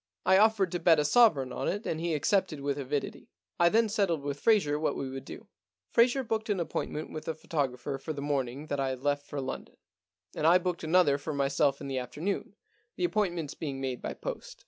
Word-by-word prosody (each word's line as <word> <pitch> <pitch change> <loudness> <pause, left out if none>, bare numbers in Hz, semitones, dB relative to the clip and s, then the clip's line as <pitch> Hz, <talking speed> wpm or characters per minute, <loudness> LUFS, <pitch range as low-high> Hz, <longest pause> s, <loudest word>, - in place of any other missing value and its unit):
I 190 +1 +6
offered 210 -4 +3
to 175 - -2
bet 165 -2 +5
a 150 - +2
sovereign 150 - +4
on - - -3
it 205 +4 -2
and 160 - -2
he 170 -2 0
accepted 180 +1 +1
with 140 0 -2
avidity. 140 +1 -4 0.3
I 170 - +6
then 225 +4 +3
settled 195 -8 0
with 145 0 -3
Fraser 190 -10 +3
what 155 - 0
we 135 - -3
would 135 0 -7
do. - - -9 0.5
Fraser 245 +3 +4
booked 220 -2 -2
an 200 -3 +1
appointment 155 -2 -3
with 155 - -6
the 160 - -3
photographer 135 -3 -3
for 155 - -5
the 145 - -5
morning 140 -1 -2
that 145 -2 -3
I 135 -1 0
left 145 +2 -1
for 145 - -4
London, 130 -1 -6 0.6
and 155 - +1
I 175 +2 +7
booked 180 -2 -3
another 160 -3 +4
for 155 +2 -4
m.yself 140 0 +1
in - - -5
the 135 -1 -2
afternoon, 145 +11 -4 0.4
the - - -3
appointments 175 - 0
being 140 -4 -5
made 130 -2 -3
by - - -4
post. - - -7
155 Hz, 215 wpm, -29 LUFS, 140-190 Hz, 0.6 s, I